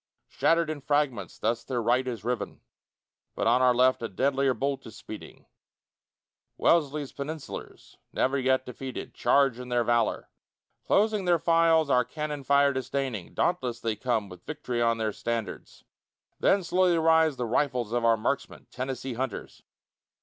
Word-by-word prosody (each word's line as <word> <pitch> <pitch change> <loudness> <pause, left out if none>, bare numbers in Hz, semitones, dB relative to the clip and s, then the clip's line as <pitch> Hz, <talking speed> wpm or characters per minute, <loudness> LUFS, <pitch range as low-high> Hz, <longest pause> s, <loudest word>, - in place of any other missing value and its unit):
Shattered 165 -1 +2
in 150 -2 -6
fragments, 135 -9 -1
thus 115 +2 -1
their 125 -2 -2
right 125 +3 +1
is 120 -4 -4
riven; 125 +1 -3 0.7
But - - -2
on 125 - +4
our 130 -1 +5
left 130 +1 +3
a 115 - -3
deadlier 135 +4 +1
bolt 135 +3 -2
is 110 - -11
speeding: 110 - -10 1.1
Wellesley's 150 -4 +2
Peninsulars, 150 +1 -8
never 130 +2 +1
yet 130 0 +1
defeated, 130 +1 -7
Charge 135 -4 +2
in 125 0 -8
their 120 -1 +2
valor. 120 -1 0 0.6
Closing 210 -1 +2
their 175 -1 +4
files, 165 -2 +3
our 125 0 +4
cannon 150 +1 -5
fire 140 +1 +4
disdaining, 130 -6 -3
Dauntless 125 -9 0
they 115 -2 -2
come 115 -3 -1
with 90 -2 -13
vict'ry 125 -6 -3
on 115 -1 +2
their 110 -2 -1
standards; 115 -5 -5 0.6
Then 195 -1 +3
slowly 180 0 +2
rise 160 -2 +4
the 125 - -3
rifles 125 -1 0
of 120 -1 0
our 115 -1 +4
marksmen, 140 +6 -3
Tennessee 130 0 -4
hunters. 130 +2 -5
130 Hz, 150 wpm, -27 LUFS, 120-150 Hz, 1.1 s, our